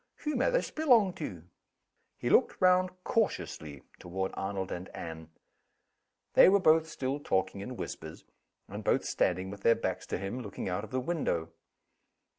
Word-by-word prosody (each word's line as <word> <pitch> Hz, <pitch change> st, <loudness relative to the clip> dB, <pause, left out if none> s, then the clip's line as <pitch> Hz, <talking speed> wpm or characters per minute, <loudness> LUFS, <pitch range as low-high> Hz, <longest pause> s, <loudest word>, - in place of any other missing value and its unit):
Who 300 Hz, -1 st, -1 dB
may 250 Hz, -, +2 dB
this -, -, 0 dB
belong 240 Hz, -, +4 dB
to?" 90 Hz, -, -5 dB, 0.7 s
He -, -, -2 dB
looked -, -, +4 dB
round 185 Hz, 0 st, +4 dB
cautiously 80 Hz, -, -2 dB, 0.2 s
toward 95 Hz, +2 st, -3 dB
Arnold 95 Hz, -1 st, -3 dB
and 90 Hz, +2 st, -5 dB
Anne. 80 Hz, -1 st, -7 dB, 1.0 s
They -, -, +8 dB
were 200 Hz, +1 st, +5 dB
both 160 Hz, -3 st, +4 dB
still 140 Hz, -2 st, -3 dB
talking 95 Hz, -6 st, -1 dB
in 125 Hz, +4 st, -6 dB
whispers, 80 Hz, 0 st, -7 dB, 0.4 s
and -, -, -7 dB
both -, -, +2 dB
standing 95 Hz, +1 st, 0 dB
with 100 Hz, 0 st, -9 dB
their 115 Hz, +2 st, +5 dB
backs 95 Hz, -4 st, -3 dB
to -, -, -2 dB
him, 100 Hz, +7 st, -4 dB
looking 100 Hz, -4 st, -6 dB
out 90 Hz, +3 st, -2 dB
of 110 Hz, -, -8 dB
the 130 Hz, -, -1 dB
window. 125 Hz, -, -1 dB
105 Hz, 160 wpm, -30 LUFS, -, 1.0 s, They